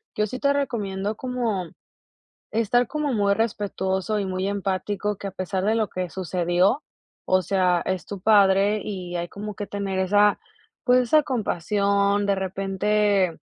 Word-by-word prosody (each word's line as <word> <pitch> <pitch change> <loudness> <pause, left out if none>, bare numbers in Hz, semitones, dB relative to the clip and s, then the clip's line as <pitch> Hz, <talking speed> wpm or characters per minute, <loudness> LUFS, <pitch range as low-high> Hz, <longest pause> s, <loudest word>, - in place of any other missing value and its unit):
yo 210 - +1
sí 255 +5 -6
te 280 0 +2
recomiendo 210 -7 -2
como 230 -8 -2 0.8
estar 230 +2 +2
como 300 +1 -2
muy 200 -3 +2
respetuoso 200 -2 -1
y 200 - -1
muy 185 0 -2
empático 200 +1 -2
que 200 - -6
a - - -5
pesar 185 0 -3
de 220 +2 +2
lo 220 -3 0
que 185 -1 -4
sucedió, 180 - +1 0.4
o 185 0 +3
sea, 185 -2 +1
es 185 -1 -2
tu 200 -2 -7
padre 200 0 +4
y 180 -4 -5
hay 170 0 -3
como 210 +3 -7
que 205 0 -5
tener 195 -2 -3
esa, 205 +2 +3 0.5
pues 250 0 +5
esa 300 +5 +3
compasión, 200 - +1
de 200 0 +2
repente 195 -1 0
200 Hz, 155 wpm, -24 LUFS, 190-215 Hz, 0.8 s, pues